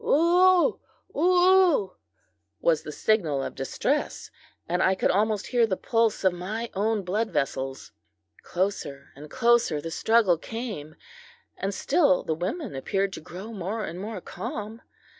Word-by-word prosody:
"Whoo! 360 - +4 0.3
whoo!" 360 - +4 0.6
was 160 -3 +2
the 150 - -7
signal 155 -7 +1
of - - -5
distress, - - -2 0.4
and 180 +2 0
I 190 0 +3
could - - +1
almost 210 +1 +1
hear 240 -2 +2
the 190 -3 -1
pulse 225 -3 0
of 190 -2 +3
my 215 +7 -5
own 210 +1 0
blood 210 +5 -1
vessels. 135 -1 -3 0.5
Closer 175 -7 -3
and 150 +2 -11
closer 235 -9 +2
the 165 +2 -6
struggle 210 -3 +3
came, 210 -11 -6 0.6
and 195 - -3
still 200 - +2
the 160 - -1
women 195 - -4
appeared 195 +8 -1
to - - -7
grow 185 +8 -9
more 210 +3 -3
and 170 - -7
more 205 -1 -6
calm. 215 +4 -6
205 Hz, 140 wpm, -26 LUFS, 175-230 Hz, 0.6 s, Whoo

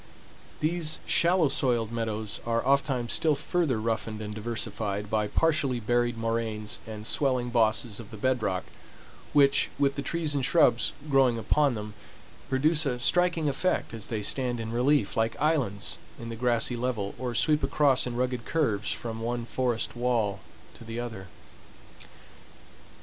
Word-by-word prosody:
These 155 0 +2
shallow 170 -1 +3
soiled 120 -5 +1
meadows 110 -2 -3
are 115 0 -1
oftentimes 135 -3 +1
still 155 -2 +2
further 145 -5 0
roughened 110 -1 -2
and 105 -1 -6
diversified 105 -2 -3
by 105 -1 +1
partially 145 -3 +1
buried 120 +1 0
moraines 115 -2 -2
and 110 -1 -7
swelling 125 -2 0
bosses 115 -1 +2
of 115 - -10
the 110 - -9
bed 130 +2 0
rock, 95 -3 -1 0.7
which, 140 -2 +4
with 140 -1 +2
the 140 - -4
trees 160 -1 0
and 140 -2 -1
shrubs 160 +5 +3
growing 135 -4 +3
upon 135 +4 +2
them, 105 0 -6 0.6
produce 150 +3 +2
a 125 -2 -1
striking 170 +3 +2
effect 185 +2 -1
as 110 -3 -7
they 110 -3 -3
stand 125 +1 +1
in 110 0 -4
relief 125 -1 +2
like 115 0 0
islands 135 -10 0 0.2
in 115 - -7
the 115 - -5
grassy 120 0 +1
level, 120 -5 -2
or 125 -2 -3
sweep 150 +4 +3
across 135 -2 +2
in 120 - -4
rugged 125 -1 -1
curves 115 -11 0
from 115 -1 -5
one 120 0 -2
forest 120 -2 -1
wall 120 -5 0 0.3
to - - -13
the 115 +1 -6
other. 110 -6 -6
120 Hz, 155 wpm, -27 LUFS, 110-140 Hz, 0.7 s, which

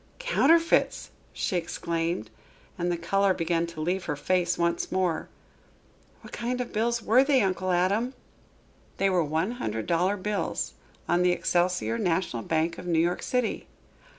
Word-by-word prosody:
"Counterfeits!" 335 - +2 0.2
she 185 - -1
exclaimed, 165 -7 -2 0.4
and 175 0 -1
the 175 - -1
color 195 +3 +2
began 170 0 0
to 170 -2 -9
leave 180 +4 -1
her 150 - -2
face 175 +3 0
once 170 0 0
more. 185 -3 0 0.9
"What - - -13
kind 245 +2 -2
of 250 - -4
bills 235 +1 0
were 250 +5 +5
they, 275 -3 +3
Uncle 185 -1 -1
Adam?" 200 +8 +1 0.8
"They 195 0 +2
were 180 -2 +3
one 160 +7 -1
hundred 110 - -3
dollar 180 +4 +1
bills, 205 +1 -2 0.3
on 175 - +2
the 180 0 +4
Excelsior 180 +6 0
National 170 - 0
Bank 165 +5 -1
of 180 - -8
New 170 -2 +1
York 170 +2 +1
City." 250 -2 -1
180 Hz, 150 wpm, -27 LUFS, 170-210 Hz, 0.9 s, were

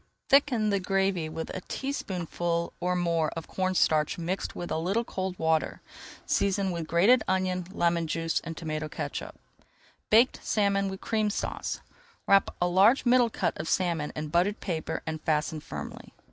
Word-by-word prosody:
Thicken 255 -6 +4
the 200 - +2
gravy 190 -3 0
with 160 +1 -5
a 185 - -5
teaspoonful 175 - -2
or 180 0 0
more 170 -3 +1
of 165 - -6
cornstarch 180 -5 +1
mixed 175 +3 -3
with 175 - -5
a - - 0
little 195 +8 0
cold 190 -4 -4
water. 160 -1 +1 0.5
Season 195 -1 +1
with 170 -2 -4
grated 200 +10 +5
onion, 185 -1 0
lemon 170 -3 +1
juice, 165 +1 0
and 165 -1 -6
tomato 155 -2 -3
catsup. - - -5 0.7
BAKED 235 +4 +5
SALMON 200 -2 +1
WITH 190 0 -7
CREAM 215 -2 0
SAUCE 205 - -3 0.4
Wrap 195 0 +5
a 175 - +2
large 195 +10 +4
middle 245 -1 +5
cut - - -1
of 155 - -4
salmon 170 -5 0
in 150 0 -4
buttered 180 +6 +1
paper 165 -5 -3
and 160 -1 -4
fasten 155 0 0
firmly. - - -8
180 Hz, 160 wpm, -28 LUFS, 165-200 Hz, 0.7 s, grated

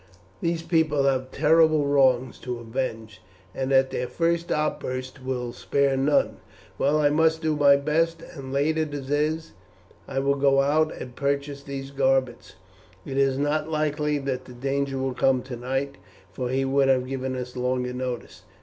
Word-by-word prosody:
These 165 -1 -1
people 160 -4 +2
have 130 -1 +1
terrible 155 +1 +4
wrongs 130 -3 +2
to 125 -1 -4
avenge, 115 -3 -5 0.3
and 135 0 -2
at 135 0 +4
their 125 - -2
first 170 +2 0
outburst 130 -3 -2
will 125 -2 -3
spare 140 -1 +1
none. 135 +2 +2 0.4
Well, 145 +2 +3
I 145 -1 +3
must 160 +1 +2
do 155 -1 +1
my 140 -1 +6
best, 165 +3 0
and 135 -3 -8
late 150 +3 +1
as 155 - 0
it 140 -2 -6
is 155 +2 0 0.6
I - - -6
will 140 +1 +2
go 140 -1 +3
out 155 +3 +2
and 125 -1 -8
purchase 140 0 -2
these 140 -1 -7
garments. 135 -2 0 0.5
It 135 - -4
is 135 -1 +2
not 150 +2 0
likely 150 -1 0
that 135 -2 -3
the 125 - -11
danger 135 +2 -2
will 130 0 -1
come 130 0 +2
tonight, 130 +1 -4 0.3
for 125 +6 -4
he 135 +1 0
would 135 0 +2
have 130 -1 +3
given 130 0 -3
us 125 0 -6
longer 125 0 -1
notice. 125 -1 -5
135 Hz, 170 wpm, -25 LUFS, 130-150 Hz, 0.6 s, my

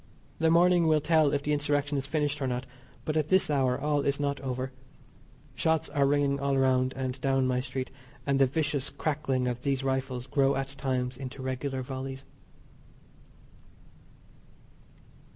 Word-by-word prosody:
The 160 0 +3
morning 175 0 +5
will 155 -1 +4
tell 155 -1 +3
if 140 0 0
the 150 - 0
Insurrection 145 0 0
is 135 0 -1
finished 150 0 -1
or 135 - 0
not, 125 0 -2 0.4
but 155 - -1
at 155 -1 +1
this 190 -4 +4
hour 130 -3 +2
all 145 0 +1
is 140 0 0
not 140 -1 -1
over. 130 0 -3 0.8
Shots 160 -1 +1
are 140 -1 +2
ringing 140 -1 +2
all 140 0 +1
around 130 -1 +2
and 130 0 -4
down 135 -1 +2
my 125 0 +1
street, 130 0 -4 0.3
and 140 -1 +1
the 135 - +5
vicious 145 0 -1
crackling 135 -4 -1
of 120 0 -3
these 135 -1 0
rifles 130 -2 -2
grow 140 -1 +2
at 135 0 -2
times 130 -2 -2
into 130 0 -7
regular 130 0 -3
volleys. 130 +1 -6
135 Hz, 160 wpm, -29 LUFS, 130-145 Hz, 0.8 s, morning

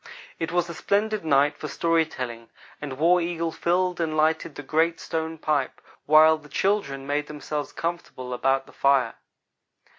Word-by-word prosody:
It 165 - -2
was 175 0 +1
a 170 - -6
splendid 210 +4 0
night 145 -1 +3
for 150 - -6
story 165 +2 +1
telling, 120 -3 -6 0.3
and 140 -3 -5
War 175 +4 +4
Eagle 170 -1 -2
filled 180 +1 0
and 155 -1 -1
lighted 160 0 +1
the 145 - -7
great 160 +4 +1
stone 160 0 -3
pipe, 150 -4 -1 0.3
while 155 +1 +6
the 150 -1 -16
children 165 -10 0
made 145 +1 -1
themselves 150 -1 -5
comfortable 165 -7 -5
about 135 +2 +1
the - - -17
fire. 135 -4 +2
155 Hz, 160 wpm, -25 LUFS, 140-170 Hz, 0.3 s, while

